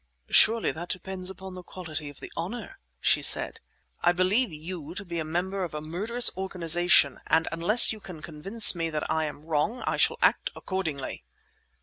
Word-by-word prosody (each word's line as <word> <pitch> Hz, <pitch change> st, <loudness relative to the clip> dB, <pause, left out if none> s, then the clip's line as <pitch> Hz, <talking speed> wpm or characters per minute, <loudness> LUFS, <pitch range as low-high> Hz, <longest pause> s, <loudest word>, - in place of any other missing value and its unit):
"Surely 225 Hz, 0 st, +3 dB
that 175 Hz, +2 st, -9 dB
depends 185 Hz, 0 st, -4 dB
upon 190 Hz, 0 st, -10 dB
the 185 Hz, -, -10 dB
quality 160 Hz, -5 st, -8 dB
of 145 Hz, -, -15 dB
the -, -, -10 dB
honour!" 235 Hz, -, -7 dB, 0.2 s
she -, -, +1 dB
said. -, -, +7 dB, 0.4 s
"I 175 Hz, -, +3 dB
believe 185 Hz, +6 st, 0 dB
you 160 Hz, +1 st, -9 dB
to 200 Hz, -, -6 dB
be 170 Hz, -2 st, -6 dB
a -, -, -3 dB
member 180 Hz, +5 st, -4 dB
of 165 Hz, -4 st, -7 dB
a -, -, -4 dB
murderous 210 Hz, +10 st, 0 dB
organization, 175 Hz, -6 st, +2 dB
and 160 Hz, 0 st, +1 dB
unless 185 Hz, +9 st, +6 dB
you 215 Hz, -, -11 dB
can 175 Hz, -6 st, -12 dB
convince 195 Hz, +8 st, +3 dB
me 165 Hz, -2 st, -4 dB
that 155 Hz, -1 st, -5 dB
I 160 Hz, 0 st, -1 dB
am 150 Hz, 0 st, -9 dB
wrong, 165 Hz, +10 st, -2 dB
I -, -, -2 dB
shall -, -, +1 dB
act -, -, +1 dB
accordingly." 160 Hz, -, -6 dB
175 Hz, 185 wpm, -25 LUFS, 160-190 Hz, 0.4 s, said